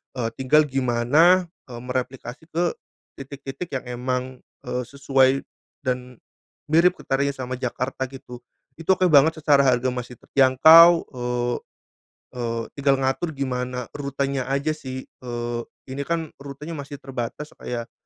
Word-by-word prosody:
eee, 120 -3 -1
tinggal 150 +4 +5
gimana, 135 +8 +3 0.2
eee, 120 -2 -8
mereplikasi 125 +1 -4
ke 170 +2 0 0.6
titik-titik 140 +4 -7
yang 130 - -3 0.2
emang, 125 0 -1 0.4
eee, 125 - -2
sesuai 135 -1 +2 0.4
dan 125 -1 -3 0.6
mirip 175 +3 +5
ketarnya 140 +1 -1
sama 130 -1 -5
Jakarta 130 +1 -3
gitu. 130 -2 -11 0.4
Itu 165 +3 +3
oke 185 -1 +2
banget, 160 +2 +5
secara 145 -2 +5
harga 130 0 +2
masih 125 0 -6
terjangkau, 150 +8 +7 0.2
eee 125 -1 -1 0.7
eee, 115 -2 -3 0.2
tinggal 140 -1 +3
ngatur 135 +4 -1
gimana 125 -2 -3
rutenya 140 -2 -3
aja 140 +3 0
sih, 130 -4 -6
eee, 120 -1 -5 0.3
ini 135 - -5
kan 165 -2 -2
rutenya 140 +3 -8
masih 145 -2 -6
terbatas 135 +1 -6
kayak 120 -1 -5
135 Hz, 130 wpm, -23 LUFS, 125-145 Hz, 0.7 s, terjangkau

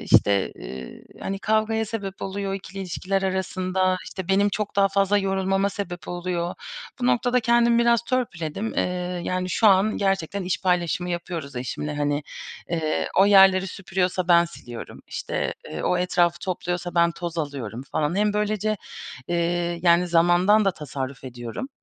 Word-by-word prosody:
işte, 100 -1 +3 0.7
hani, 195 0 -3
kavgaya 220 +1 +1
sebep 200 -3 -5
oluyor 195 0 -3
2'li 195 0 -8
ilişkiler 195 +1 -2
arasında, 185 0 0
işte, 190 -2 -7
benim 200 +1 +4
çok 205 0 -3
daha 200 0 +5
fazla 195 +1 +2
yorulmama 195 0 +1
sebep 175 -5 -6
oluyor. 175 -1 -2 0.5
Bu 245 - +1
noktada 250 0 +2
kendimi 235 0 +4
biraz 235 -1 +4
törpüledim, 215 -6 -2
eee, - - +2 0.4
yani, 185 0 -2
şu 220 - +3
an 195 +3 +4
gerçekten 195 -1 0
iş 180 - -1
paylaşımı 180 -1 0
yapıyoruz 170 -6 -5
eşimle, 150 +4 -4
hani, 145 0 0 0.5
ııı, 155 -2 0
o 195 - +7
yerleri 195 -1 +6
süpürüyorsa 185 -2 -2
ben 170 -1 +6
siliyorum, 120 -8 -9
işte, - - -3 0.2
eee, 80 - -5
o 180 - +1
etrafı 175 -1 +2
topluyorsa 180 -1 -3
ben 170 0 +4
toz 170 -1 -5
alıyorum 135 -6 -4
falan. 155 +4 0
Hem 210 0 +2
böylece, 210 0 0 0.5
eee, 175 0 0
yani, 175 0 +5
zamandan 175 +5 +4
da 195 - +4
tasarruf 135 -3 -6
ediyorum, 120 - -6
185 Hz, 150 wpm, -24 LUFS, 170-200 Hz, 0.7 s, o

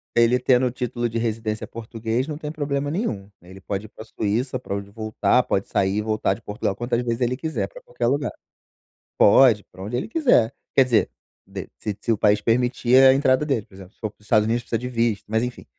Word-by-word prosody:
Ele 120 +1 +4
tendo 125 0 +3
o 125 - 0
título 120 -1 -2
de 115 0 -4
residência 110 -1 -2
português 115 +3 -3
não 150 -1 -5
tem 150 -1 -6
problema 145 -2 -2
nenhum. 110 - -3
Ele 95 +2 -13
pode 100 +2 -4
ir - - -12
pra 110 - -11
Suíça, 115 +4 -2
pra 100 - -5
onde 100 0 -6
voltar, 110 +3 +1
pode 95 - -1
sair 95 +1 +1
e - - +1
voltar 110 -2 0
de - - -10
Portugal 105 -2 -3
quantas 120 +1 -1
vezes 120 0 -2
ele 125 +1 +1
quiser, 160 +1 -2
pra - - -13
qualquer - - -3
lugar. 140 -2 0 0.9
Pode, 110 -1 +6
pra 95 +1 -12
onde 115 +4 -3
ele 195 - -3
quiser. 225 - +3 0.2
Quer 135 - +6
dizer, 120 -4 +2 0.4
de - - -7
se 105 -2 -4
se 115 - -3
o 105 - 0
país 105 0 +3
permitir 125 +2 +2
a 130 0 +8
entrada 135 +1 +2
dele, 125 -8 0
por - - -21
exemplo, 95 +1 -13
se - - -38
for 110 -2 -3
para - - -34
os - - -22
Estados 110 -2 +4
Unidos, 120 +1 0
precisa 115 - -1
de 125 - -5
visto, 115 -4 0
mas 110 +1 +1
enfim. 125 - -6
115 Hz, 230 wpm, -23 LUFS, 105-130 Hz, 0.9 s, a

